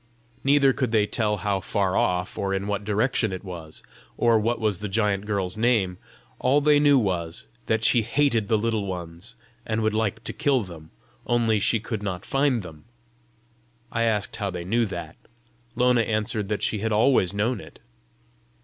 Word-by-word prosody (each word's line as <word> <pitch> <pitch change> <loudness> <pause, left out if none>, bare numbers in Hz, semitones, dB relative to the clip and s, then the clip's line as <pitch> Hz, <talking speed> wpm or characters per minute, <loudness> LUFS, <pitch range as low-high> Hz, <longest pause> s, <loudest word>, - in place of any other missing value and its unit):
Neither 140 -1 +4
could 130 -3 -1
they 110 -2 +3
tell 105 0 0
how 100 -1 -1
far 95 0 -1
off, 90 0 0
or 95 0 -1
in 95 +1 -2
what 105 0 -2
direction 110 +1 0
it 95 +1 -6
was, 85 -5 -9 0.3
or 115 -2 +4
what 115 +2 0
was 105 -5 0
the 105 -1 -4
giant 105 -1 0
girl's 100 -2 -1
name; 110 -6 +1 0.4
all 135 +3 +3
they 145 0 +4
knew 145 -1 +5
was, 90 -8 -1 0.2
that 110 0 +1
she 120 +1 +4
hated 115 -3 +1
the 110 - +3
Little 110 -2 -1
Ones, 90 +5 -7 0.3
and 110 0 -2
would 110 0 +1
like 110 0 -1
to - - -4
kill 140 -5 +1
them, 80 -4 -11 0.4
only 115 -3 +2
she 110 +2 +2
could 110 -1 -5
not 95 -2 -4
find 135 -5 +1
them. 80 -3 -12 1.1
I 115 - -1
asked 110 -3 0
how 100 -3 -2
they 90 -2 -5
knew 115 +4 +1
that; 85 -4 -7 0.6
Lona 125 -1 +3
answered 110 -2 -1
that 105 - -2
she 110 - 0
had 110 +2 -1
always 110 -4 +3
known 110 +5 0
it. - - -14
105 Hz, 180 wpm, -25 LUFS, 95-115 Hz, 1.1 s, knew